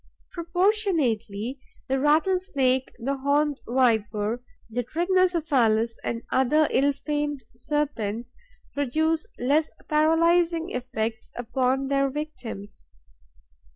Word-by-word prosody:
Proportionately, 325 - 0 0.3
the 270 0 +1
Rattlesnake, 295 -4 +2
the 275 +4 -2
Horned 285 +1 +1
Viper, 225 -2 +1 0.3
the 235 +2 -2
Trigonocephalus 310 - +2
and 230 0 -3
other 285 +4 +3
ill 280 +2 +3
famed 290 -1 -3
serpents 240 -4 -2 0.4
produce 310 +4 0
less 290 +5 +2 0.2
paralysing 330 +2 +3
effects 230 -3 -3
upon 255 +3 0
their 275 0 +2
victims. 255 -9 -7
275 Hz, 85 wpm, -25 LUFS, 240-310 Hz, 0.4 s, other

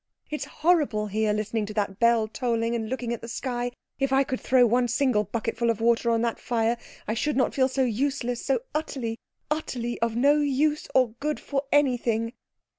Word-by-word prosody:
"It's 300 -2 -3
horrible 295 -10 +1
here, 215 +1 0
listening 215 0 -1
to 215 - -7
that 200 -2 -1
bell 235 -2 +4
tolling, 230 0 -1
and 225 -2 -2
looking 245 -2 -2
at 235 - -5
the 230 - -7
sky. 245 0 -2 0.3
If 275 -1 +1
I 270 +1 +4
could 260 -1 -4
throw 255 -1 +5
one 245 +2 +2
single 240 -3 +2
bucketful 230 +3 -1
of 230 -2 0
water 235 +1 +2
on 230 0 +2
the 235 -1 0
fire 230 0 0 0.3
I 215 - 0
should 285 +5 -1
not 260 - +2
feel 260 -1 +3
so 265 0 0
useless, 245 0 -1
so 275 - +1
utterly, 255 -7 -3 0.3
utterly 245 -6 -2
of 230 -1 0
no 285 +5 +4
use 295 +1 +1
or 255 -2 +5
good 300 +1 -1
for 280 0 -2
anything." 240 -5 +2
240 Hz, 190 wpm, -26 LUFS, 230-270 Hz, 0.3 s, throw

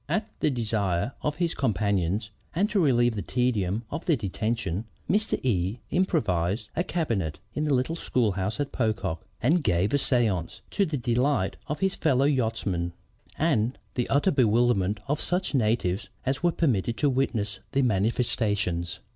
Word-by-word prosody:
At 215 0 0
the - - +2
desire 105 -5 0
of 150 - -1
his 170 -1 0
companions, 100 -3 0 0.2
and 195 +5 +3
to 205 - +2
relieve 120 -7 +3
the 105 - -3
tedium 110 -1 0
of 160 +3 -4
their 170 -4 +4
detention, 110 -2 -2 0.2
Mr. 215 +2 +1
E 95 -2 +1
improvised 105 - +1
a 175 - +1
cabinet 115 - -1 0.2
in 150 - -1
the 150 - +2
little 130 +6 0
schoolhouse 105 - 0
at 145 -1 -1
Pocock, 110 -9 -1 0.2
and 155 +6 +3
gave 90 +4 +2
a - - +5
séance, 110 - 0
to 200 -2 +2
the 155 -2 -2
delight 120 -3 +1
of 150 - -3
his 190 -1 +2
fellow 135 -4 +2
yachtsmen 110 -10 0 0.4
and 130 -7 +1 0.2
the 125 - -1
utter 145 +7 +3
bewilderment 115 -5 +3
of 145 +2 0
such 180 0 0
natives 110 -6 +1 0.2
as 135 +1 0
were 175 0 +3
permitted 120 - 0
to 150 - +2
witness 115 -7 0
the 140 0 +3
manifestations. 105 -5 0
120 Hz, 155 wpm, -27 LUFS, 100-145 Hz, 0.4 s, a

